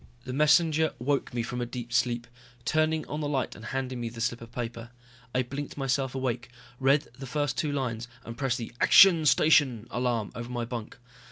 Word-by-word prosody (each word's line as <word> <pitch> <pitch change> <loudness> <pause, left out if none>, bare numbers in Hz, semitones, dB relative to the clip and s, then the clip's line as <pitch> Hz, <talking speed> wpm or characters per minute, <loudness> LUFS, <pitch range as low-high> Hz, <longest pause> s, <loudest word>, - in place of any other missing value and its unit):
The 130 - -6
messenger 155 +2 +4
woke 140 +3 -1
me 120 -1 -2
from 125 +1 -4
a - - -1
deep 120 -1 -7
sleep, 120 -1 +1 0.4
turning 155 +3 +1
on 150 +2 -4
the 145 - -2
light 135 -3 -1
and 110 - -11
handing 130 0 -3
me 115 - -2
the 115 0 -10
slip 120 +1 -1
of 115 0 -11
paper. 115 -1 -5 0.5
I 130 - +3
blinked 140 +4 -6
myself 135 -1 -1
awake, 125 -2 -2 0.3
read 140 +2 +3
the 135 - -6
first 145 0 -1
two 150 - -1
lines, 120 -5 -2 0.2
and 115 - -7
pressed 130 -1 0
the 115 -3 -6
action 170 -6 +7
station 135 -8 +4
alarm 120 -4 -1
over 120 0 -6
my 120 -1 -3
bunk. 115 -2 -6
125 Hz, 195 wpm, -28 LUFS, 120-145 Hz, 0.5 s, action